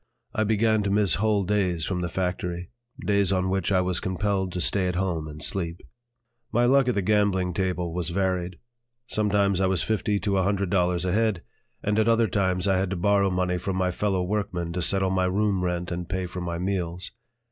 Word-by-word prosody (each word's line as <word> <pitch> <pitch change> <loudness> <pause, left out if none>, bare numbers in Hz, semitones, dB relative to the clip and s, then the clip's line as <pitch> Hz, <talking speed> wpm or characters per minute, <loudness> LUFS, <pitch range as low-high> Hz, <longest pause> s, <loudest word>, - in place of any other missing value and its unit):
I 110 - +1
began 110 0 +2
to 100 - -1
miss 100 -3 +3
whole 105 -2 +2
days 90 -4 0
from 90 -2 -2
the 85 - -2
factory, 90 0 -3 0.3
days 100 -2 +2
on 95 -1 +1
which 95 -1 0
I 95 -1 +4
was 90 -1 -1
compelled 95 0 -1
to 90 - -3
stay 95 +2 +2
at 90 - -2
home 85 -4 -1
and 75 -1 -6
sleep. 85 0 -2 0.7
My 120 +1 +3
luck 135 +1 +4
at 125 - +1
the 100 - 0
gambling 95 -3 +2
table 90 -2 -1
was 85 -2 -2
varied; 90 -1 -1 0.5
sometimes 100 -4 +1
I 95 - +3
was 95 -2 +1
fifty 105 -1 0
to 100 -2 +1
a - - +2
hundred 100 -1 0
dollars 90 -2 +1
ahead, 105 0 +1 0.4
and 105 +1 +1
at 110 - +2
other 115 0 +4
times 95 -2 0
I 95 -1 +3
had 95 0 0
to 95 - -2
borrow 100 +2 +2
money 90 -1 0
from 95 +1 -3
my 90 -1 +1
fellow 95 0 0
workmen 90 -3 -2
to 90 - -2
settle 95 +3 +1
my 95 -1 +1
room 95 0 +1
rent 90 0 -2
and 85 0 -4
pay 95 -1 -2
for 90 +1 -6
my 85 -1 -3
meals. 90 -1 -3
95 Hz, 210 wpm, -25 LUFS, 90-100 Hz, 0.7 s, I